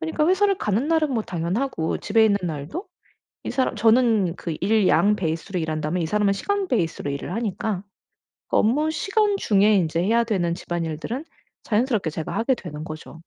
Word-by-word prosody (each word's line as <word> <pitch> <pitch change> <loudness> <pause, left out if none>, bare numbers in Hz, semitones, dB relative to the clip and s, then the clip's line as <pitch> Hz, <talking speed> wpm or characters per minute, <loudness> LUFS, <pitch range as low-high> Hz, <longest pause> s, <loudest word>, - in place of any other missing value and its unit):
그니까 160 - 0
회사를 390 +2 +3
가는 215 +8 0
날은 315 -4 +2
뭐 225 - 0
당연하고 175 +2 -2
집에 220 +1 +3
있는 205 -2 +3
날도 160 - -5 0.6
이 - - -4
사람 260 -2 0
저는 220 -5 +3
그 170 - -5
일 210 0 +3
양 210 +1 +4
베이스로 170 +1 -3
일한다면 155 +2 -2
이 165 - 0
사람은 205 +3 +2
시간 400 - -1
베이스로 170 - -1
일을 140 +5 -5
하니까 210 -3 -2 0.7
그 - - 0
업무시간 320 - +2
중에 210 - +3
인제 165 -3 +1
해야 230 +4 +3
되는 180 -7 0
집안일들은 170 - -4 0.4
자연스럽게 220 - +1
제가 160 0 -5
하게 230 +5 +2
되는 155 -9 -8
거죠. 155 0 -9
205 Hz, 375 characters per minute, -23 LUFS, 170-250 Hz, 0.7 s, 양